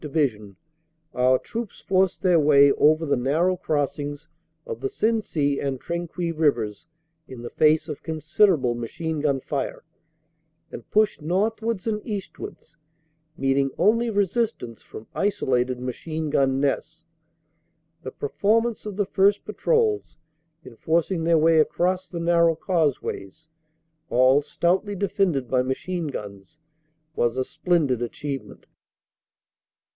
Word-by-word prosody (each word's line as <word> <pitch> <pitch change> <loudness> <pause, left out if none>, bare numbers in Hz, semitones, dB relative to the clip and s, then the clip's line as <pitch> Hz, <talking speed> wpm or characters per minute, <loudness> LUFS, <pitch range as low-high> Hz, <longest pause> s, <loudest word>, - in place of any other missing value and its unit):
Division, 130 -10 -1 0.6
our 130 +1 +3
troops 230 - -6
forced 190 -1 +1
their 180 -3 +4
way 140 -2 +6
over 155 +3 +3
the 140 -2 +1
nar 140 +7 +1
row 185 0 +2
crossings 145 -2 -3 0.4
of 465 -2 -6
the 400 - -1
Sensee 210 - 0
and 135 -2 -2
Trinquis 170 +1 -3
Rivers 120 -10 0 0.4
in 125 -2 -10
the 120 - -7
face 155 +1 +3
of 150 -3 -6
considerable 160 - +2
machine 155 +7 -4
gun 140 -2 +1
fire 135 +1 -4 0.9
and - - -10
pushed 215 -5 +2
northwards 210 +5 -1
and 215 -2 -1
eastwards, 195 -5 -7 0.6
meeting 135 0 +1
only 230 +6 +3
resistance 205 - -1
from 110 - -11
isolated 130 -10 0
machine 155 +5 -4
gun 135 -1 +2
nests. 155 +3 -2 1.0
The - - -6
performance 220 +9 0
of 205 - -5
the 205 0 0
first 200 +1 +2
patrols 450 -4 0 0.5
in 125 -3 -13
forcing 165 +1 0
their 165 -1 +4
way 160 +1 +4
across 180 +4 +1
the 170 - -5
narrow 170 -1 +3
causeways, 155 - -2 0.6
all 130 +3 +4
stoutly 185 +7 0
defended 185 -8 0
by 130 0 +2
machine 160 +6 -3
guns, 100 0 -8 0.6
was 120 +1 0
a 130 - 0
splendid 155 -7 0
achievement. 135 +3 -6
160 Hz, 125 wpm, -24 LUFS, 135-190 Hz, 1.0 s, way